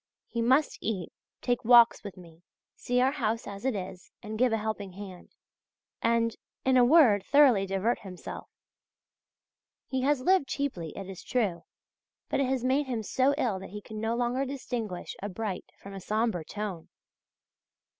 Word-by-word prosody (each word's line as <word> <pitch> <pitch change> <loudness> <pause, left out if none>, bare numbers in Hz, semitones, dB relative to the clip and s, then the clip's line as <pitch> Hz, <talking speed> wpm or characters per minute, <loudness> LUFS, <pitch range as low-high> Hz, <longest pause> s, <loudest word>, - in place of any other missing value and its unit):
He 235 - -3
must 265 +6 +2
eat, 195 -6 -3 0.3
take 245 -1 0
walks 235 0 +6
with 200 -3 -8
me, 170 -2 -15 0.3
see 245 0 0
our 260 +1 +3
house 230 -5 -1
as 200 +3 -8
it 265 -4 +1
is, 185 -1 -7
and 215 +1 -6
give 250 -1 +4
a 225 - +2
helping 210 -3 -4
hand,{GG} 190 -2 -10 0.7
and, 230 -1 +2 0.3
in 260 0 +4
a 250 - +6
word, 240 - +6
thoroughly 260 -9 +5
divert 195 +5 0
himself. 185 -2 -9 1.4
He 260 -1 -2
has 285 +1 +2
lived 370 -1 +3
cheaply, 250 - -3
it 195 - -6
is 195 -2 -8
true, 205 -9 -1 0.6
but - - 0
it 275 - +2
has 260 -2 0
made 265 +3 +1
him 235 -4 -2
so 265 +6 +2
ill 225 -10 0
that 190 - -9
he 210 +3 -7
can 215 -1 -7
no 225 +1 0
longer 245 +2 0
distinguish 245 -8 -5
a 205 - -3
bright 200 -1 -4
from 200 - -11
a 195 - -7
sombre 215 -3 0
tone. 200 -2 -6
225 Hz, 170 wpm, -29 LUFS, 195-255 Hz, 1.4 s, walks